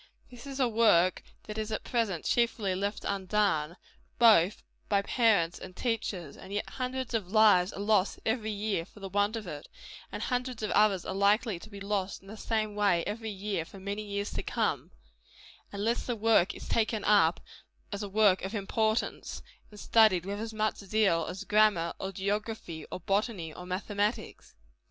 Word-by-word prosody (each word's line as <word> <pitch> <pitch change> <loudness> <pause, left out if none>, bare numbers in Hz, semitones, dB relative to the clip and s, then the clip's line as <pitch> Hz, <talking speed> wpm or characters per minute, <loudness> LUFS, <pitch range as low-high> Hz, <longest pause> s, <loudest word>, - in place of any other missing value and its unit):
It 245 +2 -11
is 275 0 -6
a 255 - +4
work 210 -6 +4 0.2
that 215 0 -6
is 215 0 -3
at 215 - -3
present 220 -8 -1
chiefly 230 -5 +1
left 200 +3 -3
undone, 190 -4 0 0.4
both 210 -5 +5 0.3
by 200 -1 +2
parents 205 -8 +2
and 185 -1 -10
teachers, 205 - -3
and 190 - -12
yet 205 0 -2
hundreds 255 -1 -4
of 200 -5 -2
lives 210 -4 +5
are - - -8
lost 205 -1 +2
every 220 -1 0
year 205 -4 -1
for 195 - -17
the 195 -1 -6
want 205 +3 +1
of 220 -2 -5
it; 150 -4 -7 0.4
and - - -4
hundreds 250 -2 -2
of 210 - -1
others 205 -3 +3
are - - -3
likely 200 0 +2
to 215 - -12
be 200 -2 -9
lost 200 -1 -3
in - - -17
the 210 - -8
same 215 -1 -1
way 200 -5 +2
every 220 +2 -4
year 200 -3 -3
for 195 +4 -13
many 200 +2 -4
years 205 -1 -4
to - - -2
come, - - -1 0.8
unless 215 +4 -1
the 245 - -1
work 220 -4 +3
is - - -9
taken 220 -2 0
up 195 -5 +4 0.5
as 200 0 -4
a 205 - -4
work 205 -2 +4
of 195 +4 -4
importance, 220 +2 -1 0.3
and 210 - -13
studied 210 -7 +4
with 200 +1 -4
as 225 0 -4
much 215 0 -1
zeal 195 -5 +1
as 185 +3 -6
grammar, 205 -5 +3
or 190 - -4
geography, 200 -4 -3
or - - -5
botany, 195 -4 -1
or 180 +2 -9
mathematics. 205 +4 -3
205 Hz, 180 wpm, -30 LUFS, 190-220 Hz, 0.8 s, both